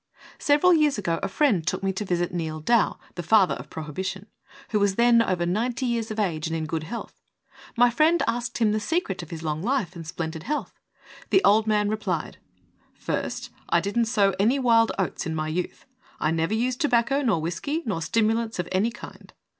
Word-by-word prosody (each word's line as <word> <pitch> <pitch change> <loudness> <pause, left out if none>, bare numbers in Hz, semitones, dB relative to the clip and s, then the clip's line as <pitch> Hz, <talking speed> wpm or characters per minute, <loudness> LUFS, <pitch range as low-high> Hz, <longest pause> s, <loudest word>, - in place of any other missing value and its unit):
Several 295 +5 +4
years 300 -5 +3
ago 170 -5 -1
a - - -1
friend 195 - +1
took - - -1
me 195 0 0
to 190 - -3
visit 175 -3 -1
Neal 160 -2 -3
Dow, 230 +8 +2 0.2
"the 175 - -5
Father 195 +2 +4
of - - -8
Prohibi 155 +3 -5
tion," 190 +1 -5 0.4
who 210 - +1
was 200 -1 +2
then 235 0 +5
over 180 -6 0
ninety 235 +8 -1
years 235 -2 -1
of 215 0 -4
age, 165 -6 -1
and 165 - -3
in 160 -1 -2
good 160 0 -3
health. 235 +8 -7 0.6
My 245 0 +5
friend 315 +7 +3
asked 240 0 -2
him 225 -3 +2
the 215 - 0
secret 215 - -2
of 170 - -10
his 165 -1 -7
long 155 0 -2
life 205 -5 -1
and 165 -2 -8
splendid 160 0 -4
health. 300 - -4 0.5
The 385 - +4
old 215 +2 +4
man 210 -1 +2
replied: 205 -6 -3 0.6
"First, - - -4 0.2
I 170 - +4
didn't 205 +6 0
sow 205 -3 +2
any 230 +7 +3
wild 230 -3 +4
oats 190 -1 -2
in 160 - -3
my 155 0 -2
youth; 175 +3 -4 0.3
I 155 - +1
never 165 +6 0
used 250 +2 -1
tobacco 270 0 +2
nor 225 - +1
whisky, 230 - -3
nor 195 -8 -2
stimulants 225 +5 0
of 175 -1 -2
any 195 +5 +2
kind. 235 - -12
210 Hz, 200 wpm, -25 LUFS, 170-235 Hz, 0.6 s, then